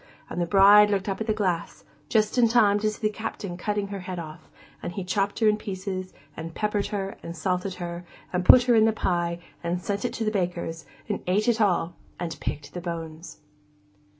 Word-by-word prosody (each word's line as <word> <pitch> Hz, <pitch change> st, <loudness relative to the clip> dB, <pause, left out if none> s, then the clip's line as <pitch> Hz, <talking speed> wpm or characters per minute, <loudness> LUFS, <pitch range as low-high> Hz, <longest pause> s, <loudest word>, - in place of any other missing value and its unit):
And 175 Hz, -, -2 dB
the 170 Hz, -, 0 dB
bride 205 Hz, +2 st, +7 dB
looked 195 Hz, -1 st, 0 dB
up 195 Hz, +2 st, -2 dB
at 220 Hz, -, -2 dB
the -, -, +2 dB
glass, 185 Hz, -6 st, -2 dB, 0.3 s
just 215 Hz, -2 st, +2 dB
in 245 Hz, -2 st, +5 dB
time 210 Hz, -3 st, +4 dB
to 215 Hz, 0 st, +1 dB
see 215 Hz, +1 st, -5 dB
the 215 Hz, -, -4 dB
Captain 205 Hz, -4 st, -5 dB
cutting 205 Hz, +2 st, -2 dB
her 200 Hz, -1 st, -5 dB
head 185 Hz, 0 st, -6 dB
off; 160 Hz, -1 st, -8 dB, 0.3 s
and -, -, -4 dB
he 195 Hz, -, -4 dB
chopped 195 Hz, +2 st, -1 dB
her 220 Hz, -, +3 dB
in 210 Hz, 0 st, +4 dB
pieces, 190 Hz, -2 st, -5 dB, 0.2 s
and 165 Hz, 0 st, -7 dB
peppered 210 Hz, -1 st, 0 dB
her, 195 Hz, -2 st, -4 dB
and 170 Hz, 0 st, -7 dB
salted 180 Hz, +2 st, -1 dB
her, 175 Hz, 0 st, -5 dB, 0.3 s
and 180 Hz, 0 st, 0 dB
put 250 Hz, +6 st, +8 dB
her 245 Hz, -1 st, +3 dB
in 220 Hz, -1 st, +6 dB
the 220 Hz, -, +3 dB
pie, 175 Hz, -4 st, 0 dB, 0.3 s
and 170 Hz, +1 st, -1 dB
sent 200 Hz, +2 st, -3 dB
it 245 Hz, -, -1 dB
to 225 Hz, -, -2 dB
the 215 Hz, -, +1 dB
baker's, 175 Hz, -4 st, -3 dB, 0.2 s
and -, -, -2 dB
ate 205 Hz, +5 st, +2 dB
it 235 Hz, -1 st, +2 dB
all, 175 Hz, -4 st, +2 dB, 0.3 s
and 170 Hz, -2 st, -4 dB
picked 145 Hz, -1 st, -5 dB
the 175 Hz, -, -5 dB
bones. 165 Hz, -2 st, -7 dB
195 Hz, 215 wpm, -26 LUFS, 175-210 Hz, 0.3 s, put